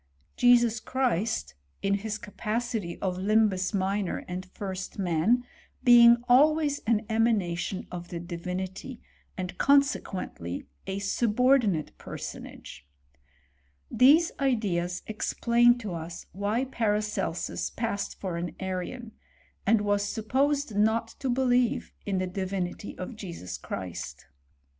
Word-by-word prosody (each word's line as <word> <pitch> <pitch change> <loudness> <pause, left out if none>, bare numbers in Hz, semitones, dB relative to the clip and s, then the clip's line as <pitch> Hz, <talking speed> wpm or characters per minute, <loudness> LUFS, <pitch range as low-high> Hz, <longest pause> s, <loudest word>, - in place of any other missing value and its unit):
Jesus 240 -2 +5
Christ, 225 - -1 0.3
in 195 0 +2
his 215 +2 -2
capacity 215 -4 -3
of 185 -2 -1
limhus 200 -1 +2
minor 195 -1 -1
and 180 +1 -5
first 190 0 -6
man, 190 +6 +2 0.4
being 235 -1 +8
always 290 +3 +4
an 225 -1 +2
emanation 210 -5 0
of 175 -1 -6
the 175 - -5
Di* 170 0 -6
vinity; 185 +8 -5 0.4
and, 180 -1 -4
consequently, 205 - +1 0.2
a 190 0 -2
subordinate 215 - +2
personage^ - - -8 1.1
These 300 +7 +6
ideas 190 -10 0
explain 235 +2 +3
to 215 -6 -5
us 170 +1 -6
why 205 +6 -1
Paracelsus 210 -7 -1
passed 205 -4 -3
for 185 -3 -3
an 170 0 -4
Arian, 190 +5 -4 0.6
and 220 0 +4
was 205 -1 +1
supposed 265 +4 0
not 220 +2 +2
to 265 - -2
believe 245 -1 +1
in 195 -2 0
the 185 - 0
Di 190 +1 -3
» - - -4
vinity 185 +1 -4
of 185 +6 -6
Jesus 170 - -7
Christ. 85 -9 -6
205 Hz, 120 wpm, -28 LUFS, 185-240 Hz, 1.1 s, being